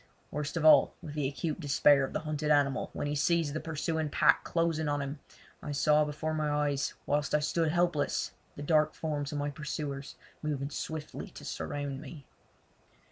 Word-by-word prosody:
Worst 150 Hz, +2 st, -3 dB
of 160 Hz, -, 0 dB
all, 155 Hz, -, +7 dB
with 150 Hz, -, -7 dB
the 150 Hz, -3 st, 0 dB
acute 150 Hz, +3 st, -3 dB
despair 145 Hz, -2 st, +4 dB
of 135 Hz, -, -3 dB
the -, -, -2 dB
hunted 155 Hz, -1 st, -2 dB
animal 140 Hz, -3 st, +2 dB
when -, -, -4 dB
he 145 Hz, -, -1 dB
sees 155 Hz, 0 st, +1 dB
the 155 Hz, -, -2 dB
pursuing 160 Hz, 0 st, -2 dB
pack 155 Hz, +2 st, +4 dB
closing 165 Hz, -2 st, 0 dB
on 145 Hz, 0 st, 0 dB
him, 140 Hz, +1 st, -4 dB, 0.4 s
I 145 Hz, -, -4 dB
saw 150 Hz, +1 st, +4 dB
before 155 Hz, +2 st, -3 dB
my 155 Hz, -1 st, 0 dB
eyes 145 Hz, -1 st, 0 dB
whilst 145 Hz, 0 st, +1 dB
I -, -, +4 dB
stood 160 Hz, +1 st, +1 dB
helpless 175 Hz, -3 st, +1 dB, 0.2 s
the 145 Hz, -, -6 dB
dark 155 Hz, 0 st, +3 dB
forms 150 Hz, -2 st, -3 dB
of 150 Hz, -, -3 dB
my 145 Hz, 0 st, -1 dB
pursuers 145 Hz, -1 st, -5 dB, 0.3 s
moving 145 Hz, -2 st, -2 dB
swiftly 155 Hz, +1 st, -5 dB
to -, -, -11 dB
surround 140 Hz, -, -4 dB
me. 145 Hz, -1 st, -10 dB
150 Hz, 185 wpm, -31 LUFS, 145-155 Hz, 0.4 s, all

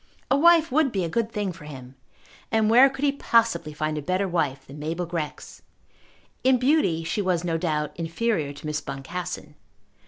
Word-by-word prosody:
A -, -, +6 dB
wife 330 Hz, +1 st, +5 dB
would 290 Hz, -1 st, +3 dB
be 195 Hz, -4 st, -1 dB
a 170 Hz, -, -2 dB
good 230 Hz, +5 st, -1 dB
thing 205 Hz, -3 st, -2 dB
for 155 Hz, -3 st, -12 dB
him; 130 Hz, -4 st, -10 dB, 0.6 s
and 220 Hz, -1 st, +2 dB
where 255 Hz, +4 st, +8 dB
could 270 Hz, +2 st, -3 dB
he 280 Hz, -, +4 dB
possibly 230 Hz, -, +1 dB
find 155 Hz, 0 st, -2 dB
a -, -, -5 dB
better 185 Hz, +5 st, 0 dB
wife 140 Hz, -7 st, -1 dB
than 140 Hz, +2 st, -11 dB
Mabel 165 Hz, +4 st, -3 dB
Grex? 165 Hz, -3 st, -6 dB, 0.8 s
In 260 Hz, 0 st, +5 dB
beauty 250 Hz, -, +2 dB
she 165 Hz, +6 st, -1 dB
was 180 Hz, -3 st, 0 dB
no 170 Hz, -2 st, -1 dB
doubt 155 Hz, -3 st, -1 dB
inferior 165 Hz, -2 st, -1 dB
to 145 Hz, +1 st, -11 dB
Miss 150 Hz, -1 st, -2 dB
Boncassen. 150 Hz, +3 st, -6 dB
175 Hz, 185 wpm, -25 LUFS, 150-230 Hz, 0.8 s, where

